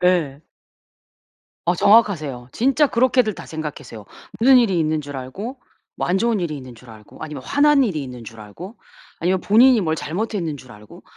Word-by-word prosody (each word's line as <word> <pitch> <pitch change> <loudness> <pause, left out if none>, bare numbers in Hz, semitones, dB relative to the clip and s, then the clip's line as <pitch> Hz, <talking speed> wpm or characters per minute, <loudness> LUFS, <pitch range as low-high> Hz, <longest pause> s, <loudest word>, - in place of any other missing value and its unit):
네. 175 -6 +1
네. - - -25 1.3
어 175 - +4
정확하세요. 175 - +2
진짜 275 +5 +2
그렇게들 245 -4 +2
다 - - -10
생각하세요. 145 -8 -8 0.3
무슨 260 +3 +6
일이 195 -8 +2
있는 155 -1 0
줄 145 -1 -8
알고 200 - -7 0.4
뭐 - - -2
안 180 - +1
좋은 230 -1 +1
일이 155 -4 -3
있는 130 -3 -10
줄 120 0 -15
알고 110 -1 -15
아니면 150 -4 -7
화난 285 - +3
일이 175 - -1
있는 125 -2 -9
줄 115 0 -12
알고 170 - -11 0.4
아니면 180 +2 0
본인이 240 +3 +5
뭘 160 -4 -1
잘못했는 175 -2 -3
줄 130 -2 -15
알고 105 0 -15
170 Hz, 355 characters per minute, -21 LUFS, 135-225 Hz, 1.3 s, 무슨